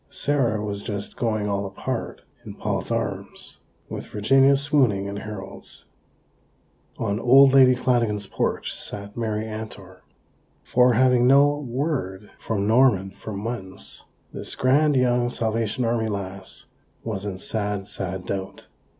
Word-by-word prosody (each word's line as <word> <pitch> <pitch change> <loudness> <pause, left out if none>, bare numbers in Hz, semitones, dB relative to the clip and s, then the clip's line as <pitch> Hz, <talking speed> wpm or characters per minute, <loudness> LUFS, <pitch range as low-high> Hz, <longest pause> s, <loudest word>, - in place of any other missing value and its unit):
Sarah 120 -7 0
was 100 -1 -4
just 100 -1 -5
"going 110 -3 -1
all 100 -1 -1
apart" 95 -1 -5 0.2
in - - -9
Paul's - - -3
arms, - - -4 0.3
with - - -6
Virginia 135 +6 +4
swooning 135 -8 +2
in 100 0 -5
Harold's. 105 -2 -8 1.1
On 100 +2 -1
old 135 +3 +7
Lady 130 -2 +7
Flanagan's 115 -5 +1
porch - - -2
sat 100 0 -7
Mary 110 -2 -2
Antor; 110 -4 -8 0.7
for, 125 0 +4
having 125 +1 +4
had 125 - +4
no 140 +2 +6
word 125 - -3
from 100 -3 -2
Norman 110 -4 +3
for 100 +2 -8
months, 100 -2 -6 0.3
this - - -5
grand 145 +3 +3
young 125 -1 +2
Salvation 115 +1 -1
Army 115 -1 0
lass 95 -2 -6 0.4
was 105 -4 -4
in 100 -3 -4
sad, 100 -1 -3
sad 95 -2 -5
doubt. 95 -1 -5
110 Hz, 135 wpm, -24 LUFS, 100-125 Hz, 1.1 s, old